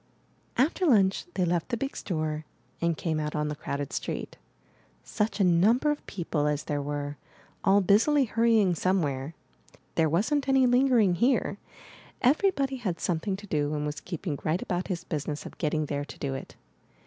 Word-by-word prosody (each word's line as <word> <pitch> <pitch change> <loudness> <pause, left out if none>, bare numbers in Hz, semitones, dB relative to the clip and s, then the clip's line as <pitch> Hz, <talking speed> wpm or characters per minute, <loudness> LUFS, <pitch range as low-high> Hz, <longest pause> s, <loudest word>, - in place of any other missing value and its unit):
III. 255 - +6
After 355 +4 -2
lunch 195 -8 +3
they 185 - +2
left 175 +2 0
the 240 - -1
big 275 +4 -3
store, 155 -4 -2 0.4
and 170 -2 +1
came 160 -3 -1
out 150 0 -3
on 150 0 0
the 150 - -3
crowded 140 0 -4
street. - - -4 0.7
Such 210 +1 -2
a - - +4
number 205 - +4
of 295 - -4
people 165 -5 -1
as 150 0 0
there 145 -1 -2
were, 145 0 -4 0.5
all 195 +1 +5
busily 230 +10 +4
hurrying 225 -4 +3
somewhere. 155 -5 -1 0.6
There 160 -1 +2
wasn't 275 - +1
any 265 -1 +5
lingering 245 -6 +4
here. 240 +10 +1 0.6
Everybody 275 -1 +2
had 190 -9 -3
something 180 +3 -1
to 205 +2 -10
do, 150 -4 -1
and 150 0 -2
was 150 -1 -3
keeping 170 -4 -4
right 160 +4 0
about 180 0 -2
his 180 -4 -3
business 150 -1 -4
of - - -10
getting 155 -1 0
there 145 0 -2
to - - -11
do 140 -2 -3
it. 135 - -7
175 Hz, 175 wpm, -28 LUFS, 150-230 Hz, 0.7 s, III